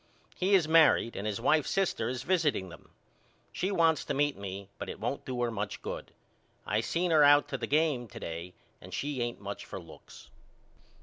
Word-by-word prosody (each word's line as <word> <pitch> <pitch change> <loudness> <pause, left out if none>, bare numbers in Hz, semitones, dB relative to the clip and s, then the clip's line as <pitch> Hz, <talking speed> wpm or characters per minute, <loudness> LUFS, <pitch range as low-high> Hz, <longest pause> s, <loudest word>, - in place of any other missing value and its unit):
He 195 +2 +3
is 175 -5 +3
married 160 -7 +5
and 100 - -3
his 105 -1 -2
wife's 150 +5 +2
sister 190 -12 0
is 125 0 -4
visiting 150 - +1
them. 85 - -14 0.6
She 185 - -2
wants 165 -6 +3
to - - -2
meet 145 +1 +1
me 100 0 -7
but - - -5
it - - -7
won't 120 +6 -3
do 125 -2 -4
her 120 - 0
much 105 -2 -4
good. - - -6 0.5
I 105 - +1
seen 170 +9 -1
her 155 -2 +6
out 145 0 +6
to 135 - -2
the - - -3
game 150 -5 +1
to - - -10
day 85 +2 -6 0.3
and 90 +1 -8
she 145 -3 -2
ain't 120 0 -3
much 100 0 -6
for 95 - -7
looks. 85 -3 -14
130 Hz, 200 wpm, -30 LUFS, 100-160 Hz, 0.6 s, her